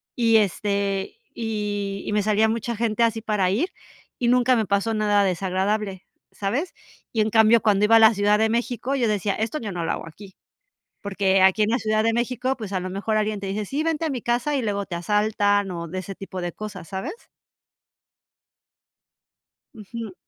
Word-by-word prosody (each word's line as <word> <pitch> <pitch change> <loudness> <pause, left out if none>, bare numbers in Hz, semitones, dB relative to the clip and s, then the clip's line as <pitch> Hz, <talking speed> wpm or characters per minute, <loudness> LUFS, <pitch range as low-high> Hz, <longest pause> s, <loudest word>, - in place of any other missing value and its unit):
y, 230 -2 +4
este, 200 -1 -1 0.2
y 205 -3 -3
y - - -3
me 210 - +2
salía 215 +1 +3
mucha 230 +1 -2
gente 230 +1 0
así 225 -1 +1
para 210 -4 0
ir, 280 - 0 0.5
y 245 - 0
nunca 250 +1 +4
me 220 - +1
pasó 200 +3 0
nada 210 -1 +2
desagradable, 190 +1 -1 0.3
¿sabes? 250 - -2 0.4
Y 225 - +2
en 215 - +1
cambio, 220 +1 +5
cuando 210 -1 +3
iba 225 +2 +5
a - - +6
la 220 0 +7
Ciudad 205 0 +2
de 220 0 +3
México, 240 +3 -1
yo 245 -4 +1
decía: 205 -1 0
"Esto 225 +7 -2
yo 215 -3 -5
no 175 -2 -3
lo - - -1
hago - - -5
aquí", 190 +4 -13 0.7
porque 195 -1 +1
aquí 190 +3 +4
en 210 - +2
la 240 - +2
Ciudad 215 -1 0
de 230 0 +2
México, 250 +2 -1
pues, 215 -4 -7
a 190 - -1
lo 185 - -4
mejor 205 +3 -2
alguien 215 -1 -1
te 200 - -5
dice: 205 +2 -3
"Sí, 280 +8 -2
vente 325 0 0
a - - -1
mi 255 -4 -4
casa", 240 +5 0
y 265 - -1
luego 200 -2 -2
te 180 - -6
asaltan, 205 +1 +1
o 170 -1 -5
de 185 +4 -5
ese 190 +1 -6
tipo 190 -1 -7
de 175 0 -3
cosas, 200 -5 -8
¿sabes? 190 0 -4 2.6
Ujú. 220 -1 -8
210 Hz, 200 wpm, -23 LUFS, 195-230 Hz, 2.6 s, la